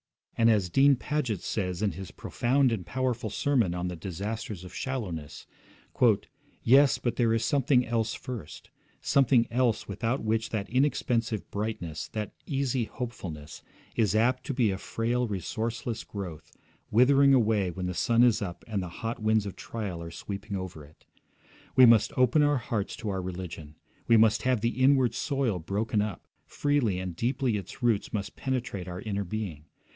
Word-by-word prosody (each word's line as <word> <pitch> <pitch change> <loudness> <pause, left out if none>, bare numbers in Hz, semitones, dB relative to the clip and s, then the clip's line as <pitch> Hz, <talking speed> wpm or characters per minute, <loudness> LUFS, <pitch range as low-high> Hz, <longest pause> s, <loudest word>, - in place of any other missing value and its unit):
And 115 0 +4
as 100 -6 +2
Dean 140 +6 +5
Paget 130 - -2
says 90 -1 -2
in 105 - +2
his 95 +3 -8
profound 130 +1 +1
and 110 -5 -2
powerful 125 0 -2
sermon 115 -7 +1
on 90 0 -2
'The 90 -1 -5
Disasters 100 +3 -5
of 90 - -10
Shallowness': 90 - -5 1.2
'Yes, 135 +3 +6
but 120 -1 -2
there 115 -2 +3
is 115 0 0
something 130 -1 +3
else 115 -1 -1
first; 115 -12 -8 0.3
something 130 -3 +3
else 120 -2 +1
without 115 +6 -2
which 110 +1 0
that 105 -3 -3
inexpensive 120 - 0
brightness, 100 -7 -4
that 105 -1 -4
easy 135 -4 0
hopefulness, 90 -13 -7 0.3
is 105 -3 +2
apt 125 +4 +2
to - - -1
be 120 -5 +3
a 95 - -4
frail 120 +4 -1
resourceless 110 +3 -3
growth, 90 -7 -7 0.4
withering 135 +4 +5
away 110 -6 +2
when 90 +1 -5
the 90 - -2
sun 115 +6 +3
is 120 -4 +4
up 90 -4 -6
and 105 -4 -2
the 90 - -5 0.2
hot 115 0 -3
winds 110 -1 +2
of 100 - -6
trial 100 -7 -5
are 85 - -6
sweeping 100 +3 -5
over 90 -5 -7
it. 75 +2 -19 0.7
We 130 0 +9
must 115 -2 +5
open 130 +4 +4
our 145 -1 +3
hearts 110 -4 -3
to 110 - -5
our 95 -1 -2
religion; 90 -4 -7 0.3
we 115 - +6
must 110 0 +4
have 125 -4 +1
the 120 +3 -1
inward 130 -3 +4
soil 130 - -1
broken 105 +5 -1
up, 105 -4 -4 0.2
freely 145 -10 +1
and 90 -2 -4
deeply 125 - 0
its 100 +5 -8
roots 115 -4 +1
must 100 -2 -4
penetrate 125 -8 -3
our 90 0 -6
inner 100 -2 -2
being. 90 -6 -5
110 Hz, 170 wpm, -28 LUFS, 95-125 Hz, 1.2 s, We